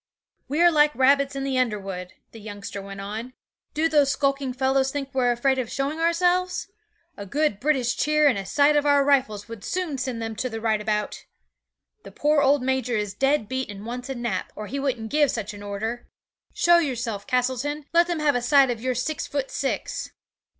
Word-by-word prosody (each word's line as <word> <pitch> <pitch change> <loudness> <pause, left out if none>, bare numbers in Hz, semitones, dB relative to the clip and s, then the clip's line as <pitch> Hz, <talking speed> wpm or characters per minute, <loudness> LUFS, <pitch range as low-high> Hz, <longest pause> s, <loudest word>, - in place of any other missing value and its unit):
'"We're 340 +5 +4
like 300 -1 +4
rabbits 275 +1 +3
in 275 - -3
the 270 -1 0
underwood," 195 -6 -3 0.2
the 225 - -11
youngster 205 -1 -7
went 195 0 -8
on. 220 +5 -6 0.4
"Do 315 +2 +2
those 295 -4 +3
skulking 275 -1 0
fellows 265 +1 +1
think 275 -2 -5
we're 250 -2 +2
afraid 265 +2 +1
of 240 -3 -3
showing 280 +3 -2
ourselves? 360 +3 +1 0.5
A 200 - -7
good 295 -3 0
British 260 -3 +1
cheer 300 0 +3
and 265 - +4
a 195 - -3
sight 285 +9 +3
of 295 0 +2
our 285 -1 +5
rifles 255 -8 +1
would 230 -3 -9
soon 340 -7 -3
send 255 -2 -3
them 225 -1 -4
to 255 - -2
the 225 -1 -5
right 220 -1 0
about. 210 -1 -2 0.8
The - - -12
poor 295 0 +2
old 280 -1 +3
major 255 -3 0
is 205 -2 -2
dead 270 0 +1
beat 260 0 -3
and 205 0 -8
wants 250 +2 -6
a 270 - -3
nap, 235 -6 -3
or 215 - -6
he 275 +6 -4
wouldn't 250 -5 -2
give 295 -1 +3
such 215 -3 -3
an 205 - -10
order. 220 +4 -4 0.4
Show 345 0 +4
yourself, 235 -9 -3
Castleton; 260 +4 -1
let 340 +1 +5
them 345 -3 -2
have 295 -1 +3
a 245 - 0
sight 265 +1 +4
of 230 -2 -5
your 255 0 -1
six 275 +5 -2
foot 280 -2 -3
six. 275 - -3
260 Hz, 200 wpm, -24 LUFS, 225-290 Hz, 0.8 s, our